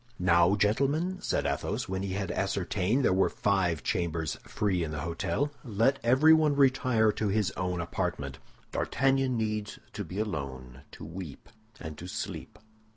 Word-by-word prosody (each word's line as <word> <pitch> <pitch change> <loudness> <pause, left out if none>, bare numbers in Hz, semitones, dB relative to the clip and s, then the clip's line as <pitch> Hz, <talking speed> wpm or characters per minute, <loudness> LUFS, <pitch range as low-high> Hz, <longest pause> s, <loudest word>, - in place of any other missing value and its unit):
"Now, 85 0 +4
gentlemen," 140 - +1
said - - -1
Athos, - - -2
when 95 0 -2
he 95 -1 -3
had 95 -1 -2
ascertained 100 +5 0
there - - +4
were 95 +1 +3
five 90 -6 0
chambers 80 -3 -1
free 95 -4 0
in 80 - -3
the 75 -1 -4
hôtel, 85 - -1
"let 115 +3 +1
everyone 150 +4 +5
retire 130 -5 +3
to 105 +1 -2
his 105 0 +1
own 90 -1 -2
apartment. 85 -1 -3 0.3
D'Artagnan 135 -1 +1
needs 105 -1 -2 0.2
to - - -4
be 95 - -8
alone, 65 - -4
to - - -9
weep 80 -2 -8 0.3
and 75 -1 -7
to 90 - -7
sleep. - - -6
100 Hz, 155 wpm, -29 LUFS, 85-125 Hz, 0.3 s, everyone